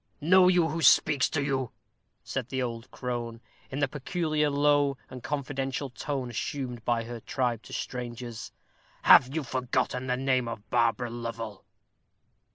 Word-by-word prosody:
"Know 180 +4 +6
you 180 -2 +4
who 165 +2 -3
speaks 145 -3 +5
to 145 - -1
you?" 135 -3 -1 0.5
said 130 -3 -4
the 130 - -2
old 115 -1 -5
crone, 120 -2 -4 0.3
in 135 - -5
the 145 - +3
peculiar 150 +2 -1
low 145 -1 +3
and 130 - -8
confidential 135 -1 -3
tone 130 -1 -4
assumed 125 0 -4
by 115 -1 +1
her 120 0 -7
tribe 120 -1 -1
to - - -12
strangers. 120 -2 -5 0.5
"Have 130 +3 +7
you 160 - 0
forgotten 125 0 -1
the 125 0 0
name 130 -2 +1
of 115 -2 -6
Barbara 115 0 +2
Lovel?" 115 -3 -6
130 Hz, 150 wpm, -28 LUFS, 120-145 Hz, 0.5 s, Have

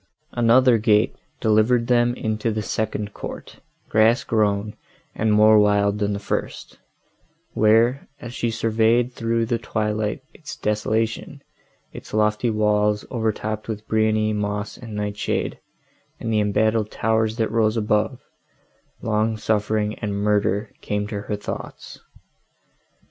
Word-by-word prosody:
Another 120 0 +4
gate 105 -1 +3 0.3
delivered 110 +2 +3
them 120 0 +2
into 110 -1 -2
the 110 0 -2
second 105 -1 -3
court, - - -8 0.3
grass 110 +3 +3
grown, 105 -1 0 0.4
and 110 0 0
more 105 0 +6
wild 105 0 +2
than 105 0 0
the - - -2
first, 100 - -4 0.7
where, 115 +5 +3
as 120 0 -8
she 120 - -1
surveyed 115 +2 +1
through 115 0 0
the 115 0 -1
twilight 105 +1 -2
its 155 - -9
desolation—its 110 +1 -4
lofty 105 +2 +2
walls, 105 -1 +1
overtopped 110 -2 -2
with 110 -1 -6
briony, 110 0 +1
moss 105 0 -3
and 115 -3 -9
nightshade, 105 0 -2 0.6
and 115 - -3
the 110 - +3
embattled 105 +1 +1
towers 110 0 0
that 110 -3 0
rose 110 0 +2
above,—long 110 0 -3
suffering 105 0 0
and 105 -2 -3
murder 105 0 0
came 105 0 -2
to 105 -1 -5
her 105 - -3
thoughts. 105 - -7
110 Hz, 120 wpm, -22 LUFS, 105-115 Hz, 0.7 s, more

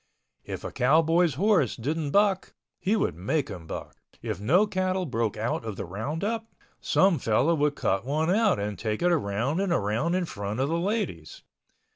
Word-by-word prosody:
If - - -6
a - - -5
cowboy's 160 +4 +3
horse 180 - +2
didn't 150 +5 -2
buck, 200 +2 +2 0.2
he 200 +4 +1
would 210 - 0
make 130 - -1
him 80 -3 -8
buck. - - -7 0.3
If 95 - -4
no 170 - +4
cattle 185 -2 -1
broke 115 -7 -1
out 115 +2 -2
of 110 -3 -5
the - - -5
roundup, 165 - -3 0.3
some 190 -5 +3
fellow 125 +8 +2
would 150 -2 +1
cut 95 -6 0
one 155 +6 0
out 210 0 +3
and 100 -1 -4
take 110 +6 -2
it 175 - +4
around 130 - 0
and 195 -2 0
around 135 - 0
in 185 -1 0
front 105 -5 -5
of 135 +2 +1
the 165 +1 0
ladies. 185 - -3
150 Hz, 180 wpm, -27 LUFS, 110-185 Hz, 0.3 s, no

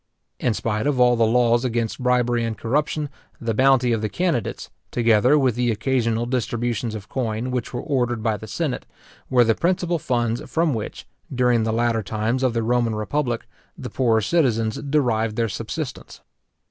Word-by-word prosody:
In 120 - 0
spite 105 +4 -1
of 140 -3 +1
all 125 0 +5
the 115 -1 +3
laws 120 +1 +3
against 120 -1 -2
bribery 125 -1 +2
and 115 -1 -3
corruption, 150 +5 -1 0.3
the 115 -1 -2
bounty 130 0 +4
of 110 - -1
the 110 - -1
candidates, 170 - -2 0.2
together 120 +4 +4
with 130 -4 +2
the 120 +1 0
occasional 115 0 0
distributions 120 -2 -2
of 105 -1 -8
coin 120 -1 -2
which 125 -2 -3
were 120 - -4
ordered 120 -6 -1
by 110 -2 +1
the 110 - -10
senate, 150 +3 -3 0.4
were 125 -2 +5
the 115 -1 +3
principal 175 - 0
funds 120 -3 -1
from 165 -2 +2
which, 110 -3 -5 0.3
during 125 -2 +2
the 110 - 0
latter 115 0 +1
times 110 +5 -1
of 130 -3 +1
the 115 - +1
Roman 120 -1 +1
republic, 120 +2 -2 0.3
the - - -7
poorer 115 -4 +2
citizens 115 -5 +1
derived 120 -7 0
their 115 0 +1
subsistence. 125 +6 -6
120 Hz, 170 wpm, -23 LUFS, 115-130 Hz, 0.4 s, all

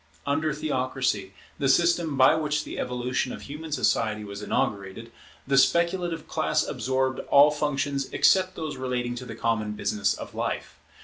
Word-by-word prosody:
Under 155 +2 0
theocracy, 130 -9 -1 0.3
the 135 - +1
system 170 -1 +2
by 130 +2 +6
which 150 -1 0
the - - -7
evolution 125 +1 -2
of - - -8
human 155 +3 -8
society 110 -7 +1
was 100 0 -7
inaugurated, 100 +2 -2 0.3
the 135 0 +4
speculative 170 +1 +1
class - - 0
absorbed 130 0 -1
all 145 +1 +7
functions 140 -2 -1
except 185 -1 +3
those 155 -3 -5
relating 125 -2 -2
to 125 +1 -7
the 120 - -7
common 110 -2 -1
business 105 -1 0
of - - -9
life. - - -4
135 Hz, 150 wpm, -26 LUFS, 120-150 Hz, 0.3 s, all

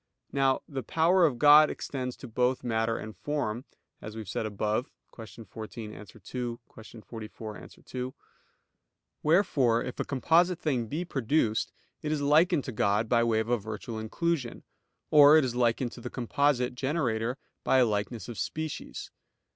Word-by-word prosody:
Now 135 -1 +2
the 135 -3 -4
power 165 +7 +3
of 130 -5 -3
God 150 +3 +8
extends 125 -2 -4
to 130 - -10
both 125 +2 0
matter 115 -1 0
and 110 0 -7
form; 135 -5 -3 0.4
as 110 0 -8
we 110 - -5
have 105 - -9
said 110 - -2
above 105 +4 -1 0.3
(Q. 110 0 -10
14, 110 +1 -8
A. - - -9
2; 120 +1 -6 0.2
Q. 110 0 -12
44, 110 -1 -8
A. - - -11
2); 130 0 -7 1.1
wherefore 145 - +3
if 125 - -7
a - - +1
composite 170 +6 +2
thing 135 -9 -1
be 160 +9 -3
produced, 125 -6 0 0.3
it 150 - -3
is 155 - 0
likened 150 +2 +3
to - - -5
God 105 0 +1
by 115 0 +3
way 115 -1 +2
of 110 - -5
a 120 -1 +2
virtual 110 +2 -6
inclusion; 130 +3 -2 0.5
or 150 +1 +8
it 155 - +4
is 125 - -2
likened 120 0 +1
to 120 - -11
the 125 - -5
composite 125 0 +1
generator 125 -3 -1 0.3
by - - +3
a 125 - +6
likeness 105 -1 -2
of 120 - -7
species. 155 -1 -5
125 Hz, 170 wpm, -29 LUFS, 110-145 Hz, 1.1 s, God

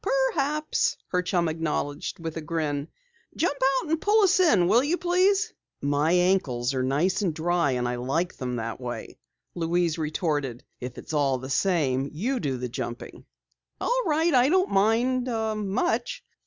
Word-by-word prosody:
"Perhaps," 300 0 0
her 180 - +1
chum 175 -2 0
acknowledged 155 -2 -3
with 165 -2 -6
a 160 - -4
grin. 150 -2 -2 0.5
"Jump 325 -3 0 0.2
out 305 +4 -3
and 320 - +1
pull 420 +1 +4
us 380 -1 +4
in, 210 - +4
will 230 +7 +4
you 320 +5 +1
please?" 375 +4 +2 0.3
"My 145 +3 +1
ankles 175 -9 +2
are 130 - 0
nice 160 +10 +1
and 175 -6 -1
dry 170 -3 +1
and 125 -1 -1
I 120 0 -2
like 140 +9 -1
them 125 -1 -4
that 115 +1 -4
way," 120 -1 -6 0.3
Louise 170 -1 0
retorted. 150 -5 -2 0.2
"If 125 0 -7
it's - - -8
all 140 -3 +2
the 130 +2 -7
same, 140 -6 +1
you 245 - -2
do 135 -5 -2
the 125 0 -3
jumping." 120 0 -6 0.5
"All - - +1
right, 320 +1 +2
I 255 +1 +5
don't 370 +3 +2
mind 235 +5 +2 0.4
much." 350 - -1
170 Hz, 165 wpm, -26 LUFS, -, 0.5 s, I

